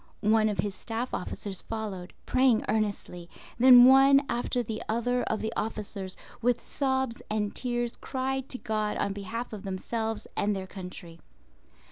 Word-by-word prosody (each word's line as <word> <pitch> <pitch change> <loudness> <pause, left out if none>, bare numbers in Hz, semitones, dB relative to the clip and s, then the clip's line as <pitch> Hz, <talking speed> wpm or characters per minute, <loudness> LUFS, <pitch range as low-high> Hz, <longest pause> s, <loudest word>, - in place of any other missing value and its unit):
One 215 0 +4
of 205 - -3
his 205 -2 -1
staff 230 +4 -5
officers 190 +1 -4
followed, 205 -5 -5
praying 255 -3 +3
earnestly, 205 -5 -2 0.3
then 245 0 +9
one 270 +2 +7
after 245 +1 -1
the 220 -1 -5
other 245 +3 +1
of 220 - -1
the 220 +1 -2
officers, 205 -3 -4 0.2
with 240 0 +1
sobs 265 -3 -1
and 210 -1 -1
tears 240 -1 -2
cried 265 0 -3
to 255 - -2
God 215 -3 -2
on 200 - -1
behalf 220 +5 -5
of 210 - -6
themselves 220 +4 -3
and 205 0 +1
their 190 -1 -4
country. 180 -3 -9
220 Hz, 150 wpm, -28 LUFS, 205-245 Hz, 0.3 s, then